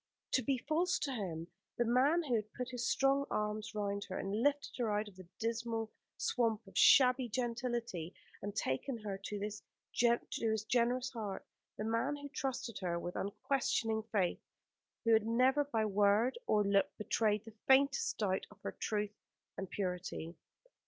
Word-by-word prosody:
To 260 - +3
be 265 +2 +1
false 355 +4 +2
to 285 - -2
him 170 -8 -4 0.3
the 240 - +2
man 270 +9 +4
who 270 -6 -2
had 215 -2 0
put 250 0 -4
his 245 -1 -1
strong 275 +1 +3
arms 215 +1 -2
round 200 -1 -2
her 185 - -5
and 200 +3 -2
lifted 290 +2 +1
her 230 -3 +1
out 210 +1 0
of 200 - -12
the 185 -2 -12
dismal 225 -1 -2 0.3
swamp 225 -3 0
of 195 -2 -16
shabby 250 +4 +6
gentility 235 -7 -2 0.3
and 205 0 -5
taken 215 - -1
her 195 -2 -4
to 205 +1 -4
his 205 0 -4 0.3
generous 235 +1 +1
heart; 215 -5 -5 0.3
the - - -3
man 230 +6 0
who 285 0 -8
trusted 260 -5 -3
her 175 -3 -1
with 175 +1 -5
unquestioning 225 +1 0
faith, 190 -5 +1 0.6
who 230 - +5
had 220 0 +4
never 255 +5 +4
by 225 -6 0
word 205 +4 +3
or 210 -1 +4
look 200 0 +3
betrayed 215 0 +1
the 225 - -11
faintest 275 +1 +4
doubt 195 -3 0
of 210 - -17
her - - -2
truth 210 -1 -2 0.4
and 190 -1 -5
purity. 180 -3 -3
225 Hz, 165 wpm, -35 LUFS, 205-250 Hz, 0.6 s, shabby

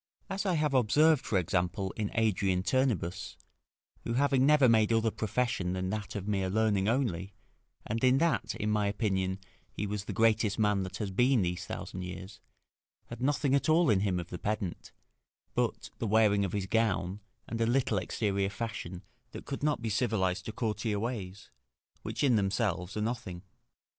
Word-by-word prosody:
As 195 +1 -2
I 180 - +2
have 150 -2 +1
observed, 145 +5 +4
for 100 - 0
example, 90 +1 -1
in 105 -2 -2
Adrian 100 -5 +1
Turnebus, 110 - -1 0.7
who 115 - -2
having 135 +1 +3
never 150 -3 +6
made 110 -1 +4
other 115 0 +2
profession 110 -5 -1
than 95 0 -2
that 105 0 -4
of 100 -1 -4
mere 95 -3 0
learning 105 -1 +2
only, 100 -7 -1 0.5
and 115 +3 -3
in 130 +1 +5
that, 165 +3 +1
in 105 +1 -1
my 105 -1 +1
opinion, 95 -2 -1 0.3
he 105 - -4
was 105 -1 -4
the - - -4
greatest 110 -2 +2
man 105 -3 +2
that 95 -1 -5
has 105 -3 -3
been 125 +2 +3
these 90 0 -3
thousand 90 - -6
years, 90 +2 -8 0.7
had - - -8
nothing 140 0 +1
at 140 +3 +2
all 160 -4 +5
in 100 - +3
him 95 -2 0
of 85 0 -7
the 90 - -5
pedant, 105 -4 -3 0.6
but - - -1
the 115 - -1
wearing 105 -1 +4
of 95 - -2
his 100 -2 -1
gown, 100 -3 0 0.3
and 115 0 -3
a 115 - +3
little 120 -4 +2
exterior 100 +1 -1
fashion, 100 -4 -5 0.3
that - - -8
could 135 - -5
not 145 -5 0
be 115 - -1
civilised 100 -5 0
to - - -4
courtier 110 -2 -2
ways, 100 -4 -5 0.5
which - - -4
in 125 -5 +4
themselves 95 -1 -1
are - - -1
nothing. 105 -6 -4
105 Hz, 180 wpm, -30 LUFS, 95-120 Hz, 0.7 s, never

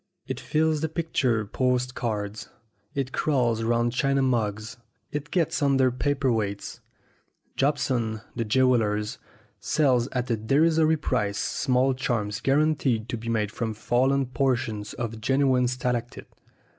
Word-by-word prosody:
It 130 -1 -4
fills 155 0 +1
the 160 - -1
picture 140 -9 0
post 125 +3 0
cards, 105 -3 -4 0.5
it 135 -2 -2
crawls 120 -8 +1
round 120 +1 +1
china 135 +1 +1
mugs, 110 -4 -1 0.3
it 145 +1 -4
gets 165 -4 0
under 135 -2 +3
paper 135 +1 0
weights. 100 -2 -3 0.8
Jobson, 130 -6 0
the 120 - -1
jewel 125 +3 +3
ler, 105 -1 0 0.6
sells 130 -6 +2
at 125 -2 -3
a 115 - +1
derisory 155 +7 +3
price 105 -9 -1
small 130 -1 +1
charms 115 -5 -2
"guaranteed 135 -5 +1
to - - -2
be 115 +1 -6
made 105 -3 0
from 110 -1 -3
fallen 130 +5 +1
portions 120 -5 -1
of 115 -2 -5
genuine 130 0 +2
stalactite." 125 -1 -3
125 Hz, 130 wpm, -26 LUFS, 115-140 Hz, 0.8 s, under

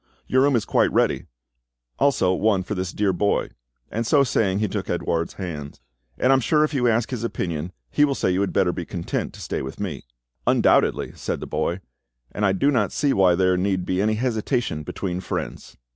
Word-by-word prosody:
Your 130 - +2
room 140 -1 +4
is 110 - +1
quite - - +2
ready, - - +1 0.7
also 110 -10 +3
one 100 0 +2
for 105 - -4
this 95 -2 -3
dear 100 -2 +1
boy," 100 +3 +1 0.4
and 115 - -1
so 140 +4 +4
saying 100 -7 +1
he 105 +1 +1
took - - -4
Edouard's 85 0 -1
hand; 75 -6 -6 0.4
"and 130 - +3
I - - +7
am 135 - +4
sure 150 +5 +3
if 155 - -1
you 125 -3 +2
ask 115 +1 +1
his 120 -3 -3
opinion, 85 -7 -3 0.2
he 145 - +3
will 140 -2 +2
say 95 - +1
you 90 +2 +1
had 100 - 0
better 90 - +2
be 90 - -4
content 85 +1 -3
to - - -11
stay - - -3
with 65 - -7
me." - - -4 0.4
"Undoubtedly," - - +3
said - - -4
the - - -6
boy; 90 +3 -2 0.5
"and 105 -1 0
I - - +3
do 120 +10 +2
not 110 -7 +1
see 140 -2 +1
why 95 -2 +4
there 90 0 +2
need 95 -1 0
be 95 +1 0
any 110 +1 +2
hesitation 115 - -1
between 90 +4 -4
friends." - - -5
100 Hz, 210 wpm, -23 LUFS, 90-120 Hz, 0.7 s, I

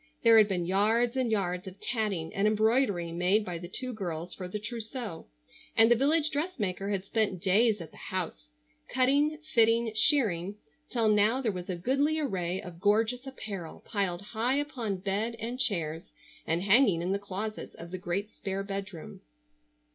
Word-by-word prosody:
There 230 -1 +8
had 215 - +6
been 180 -4 -1
yards 220 +6 +2
and 255 -3 +1
yards 180 -4 -1
of 190 +1 -9
tatting 210 -8 -2
and 200 +1 +2
embroidery 215 -5 +2
made 180 +5 +2
by 175 -2 -4
the 175 - -7
two 255 +7 -4
girls 175 -4 -5
for 185 - -6
the 185 - -4
trousseau, 225 -3 -6 0.5
and 225 +1 +6
the - - +7
village 300 +5 +2
dressmaker 220 - -2
had 195 -2 -2
spent 205 -3 0
days 210 +4 +3
at 165 -3 -9
the - - -16
house, - - -4 0.4
cutting, 285 +4 +3 0.2
fitting, 230 0 +4
shirring, 210 - +2 0.3
till 230 -2 +1
now 210 +4 +4
there 240 -5 0
was 180 -1 -7
a 185 - -1
goodly 275 - +1
array 185 - -1
of 170 -2 -9
gorgeous 225 +5 +2
apparel 200 -10 -7
piled 195 -4 -1
high 235 +5 0
upon 255 -9 -2
bed, 200 +5 -2
and 240 +3 -5
chairs, 165 -9 0 0.4
and 165 +3 0
hanging 200 -4 +4
in 180 - -1
the 200 - 0
closets 200 +2 -5
of 170 +1 -10
the 185 - -5
great 195 +4 -3
spare 195 0 -4
bedroom. 195 -4 -6
205 Hz, 170 wpm, -29 LUFS, 185-235 Hz, 0.5 s, There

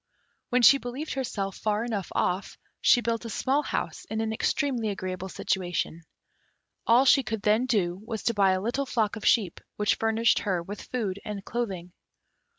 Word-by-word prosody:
When 250 -1 +2
she 255 +5 +8
believed 255 +4 -5
herself 205 -7 -3
far 215 0 0
enough 210 -6 -3
off, 185 +2 -1 0.2
she 245 - +5
built 230 0 -1
a 230 - -6
small 270 +6 +1
house - - -3
in 220 - -4
an 220 0 -1
extremely 245 -2 0
agreeable 185 -1 -4
situation. 175 -3 -2 0.9
All 240 +4 +6
she 275 +1 +6
could 220 -5 -4
then 215 +4 +3
do 190 -6 0
was 220 -1 -5
to 230 - +1
buy 195 -3 +4
a 185 - -1
little 245 +6 -1
flock 220 -4 0
of 215 - -3
sheep, 200 -8 +2 0.2
which 210 0 +2
furnished 225 +1 +2
her 185 -5 -1
with 205 +4 -7
food 205 -6 -3
and 205 -1 -6
clothing. 195 -7 -4
220 Hz, 175 wpm, -27 LUFS, 195-240 Hz, 0.9 s, she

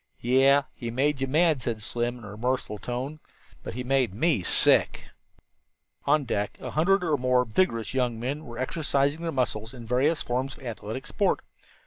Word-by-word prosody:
"Yeh, 135 +3 +4
he 120 - -5
made 135 +4 0
you 135 - +1
mad," 155 0 +3
said 110 -2 -3
Slim 120 +2 -2
in 120 - -13
a 105 - -8
remorseful 110 -1 -2
tone, 130 +8 -4 0.4
"but - - -7
he 125 - -3
made 130 -5 +1
me 155 - +2
sick." - - +2 1.0
On 145 +1 +3
deck 105 -5 -2
a - - -6
hundred 180 +5 +3
or 155 -4 +1
more 125 -1 +2
vigorous 115 -1 0
young 125 -3 0
men 140 +6 -3
were 120 -3 -9
exercising 140 +2 0
their 165 -1 -2
muscles 115 -2 -2
in 120 -2 -9
various 135 +7 +1
forms 130 +2 -2
of - - -15
athletic 115 +2 -5
sport. 200 - 0
130 Hz, 175 wpm, -27 LUFS, 120-145 Hz, 1.0 s, Yeh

